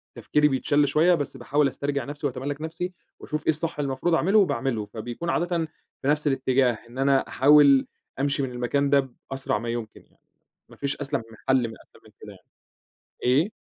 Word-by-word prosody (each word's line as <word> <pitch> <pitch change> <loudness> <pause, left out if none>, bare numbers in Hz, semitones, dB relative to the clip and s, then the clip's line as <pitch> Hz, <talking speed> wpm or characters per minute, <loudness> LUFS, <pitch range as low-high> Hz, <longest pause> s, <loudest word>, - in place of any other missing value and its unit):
تفكيري 150 0 +2
بيتشّل 145 +1 +2
شويّة 165 +5 +4
بس 145 -3 -4
باحاول 140 +4 +1
أسترجع 140 0 -2
نفْسي 145 +1 -3
وأتملّك 140 +3 -5
نفْسي 170 +3 -4 0.3
وأشوف 155 0 -4
إيه - - -1
الصح 160 0 -1
اللي 140 - 0
المفروض 150 +6 -1
أعمله 195 +6 +3
وباعمله، 120 - 0
فبيكون 120 +10 -6
عادةً 175 +1 0 0.4
في 135 - -3
نفْس 150 +1 +2
الاتجاه 130 -2 +2 0.2
إن 120 - -12
أنا 135 0 +2
أحاول 140 -1 +5 0.3
أمشي 140 0 0
من 130 - -3
المكان 125 +4 0
ده 140 -1 +3 0.2
بأسرع 135 -5 -1
ما 115 +2 -5
يمكن 115 -2 -5
يعني، - - -31 0.5
ما - - -14
فيش 140 -1 -2
أسلَم 140 -5 -3
من 110 - -14
حل 130 -3 +3
من 110 - -9
أسلم - - -23
من - - -17
كده - - -10
يعني. - - -22 0.7
إيه؟ 145 - +3
140 Hz, 190 wpm, -25 LUFS, 130-150 Hz, 0.7 s, أحاول